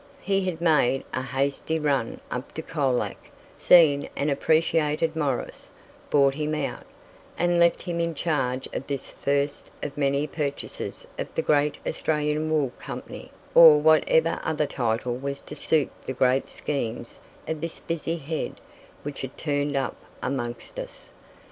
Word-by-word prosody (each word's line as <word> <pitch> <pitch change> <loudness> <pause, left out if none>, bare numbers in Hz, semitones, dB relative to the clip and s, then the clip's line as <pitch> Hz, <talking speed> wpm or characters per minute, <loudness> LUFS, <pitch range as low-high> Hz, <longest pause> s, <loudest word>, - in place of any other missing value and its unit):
He 195 -1 +1
had 165 -2 -6
made 150 -6 +3
a 130 - 0
hasty 140 +4 -1
run 140 -6 0
up 125 +2 -5
to 160 - -4
Colac, 135 -7 0 0.4
seen 150 -5 +5
and 145 +1 0
appreciated 160 +1 +2
Morris, 145 -5 -2 0.4
bought 140 -2 +4
him 150 +1 -2
out, 150 -2 -4 0.5
and 175 0 +2
left 170 0 +4
him 170 -1 -3
in 170 -1 -1
charge 135 -5 -1
of 135 - -4
this 140 -2 -4
first 140 +1 -1
of 145 - -4
many 140 0 +1
purchases 145 -2 -4
of - - -2
the - - 0
great 145 -1 +2
"Australian 150 0 0
Wool 150 -5 +1
Company," - - -8 0.2
or 160 -3 +10
whatever 160 +1 +4
other 155 -1 0
title 120 -2 -1
was 140 +1 -4
to - - -9
suit 155 -3 +1 0.2
the 130 - -2
great 130 +1 +2
schemes 120 -5 -4 0.3
of 160 -1 -3
this 165 0 -3
busy 165 0 -2
head 160 0 -4 0.4
which 145 -1 -5
had 135 0 -7
turned 145 -1 -1
up 135 -3 -1 0.3
amongst 130 - -4
us. - - -9
150 Hz, 150 wpm, -26 LUFS, 135-160 Hz, 0.5 s, or